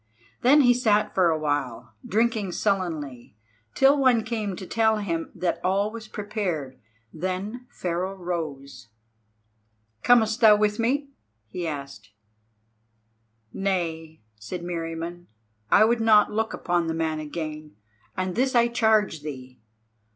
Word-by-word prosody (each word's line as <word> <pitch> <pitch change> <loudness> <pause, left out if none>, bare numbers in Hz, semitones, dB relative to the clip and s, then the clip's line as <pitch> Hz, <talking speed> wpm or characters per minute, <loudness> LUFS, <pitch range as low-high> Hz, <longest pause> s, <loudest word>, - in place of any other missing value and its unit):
Then 285 +5 +6
he 245 -2 +5
sat 215 -4 +1
for 185 -3 +3
awhile, 145 -7 -2
drinking 220 -3 0
sullenly, 155 - -2 0.4
till 275 +2 +5
one 250 -4 +4
came 215 -4 -3
to 185 - -8
tell 220 +2 +2
him 170 -6 -3
that 180 - -1
all 200 +3 +1
was 225 -1 -9
prepared. 180 -12 -4 0.3
Then 185 +8 -4
Pharaoh 185 -1 -3
rose. 160 - -5 1.1
"Comest 230 -1 +3
thou 215 -2 +8
with 210 0 0
me?" 275 +5 0 0.4
he 175 +4 -4
asked. 140 -8 -7 1.4
"Nay," 165 -5 -3 0.2
said 170 +12 -6
Meriamun, 170 0 -5 0.4
"I 215 - +6
would 230 +1 +1
not 215 -2 +5
look 220 +1 -1
upon 175 -1 -1
the 160 - -2
man 160 -1 -1
again; 155 -1 -6 0.4
and 185 0 -1
this 255 +4 0
I 235 0 +4
charge 220 -8 +2
thee. 130 -4 -8
185 Hz, 125 wpm, -25 LUFS, 160-220 Hz, 1.4 s, thou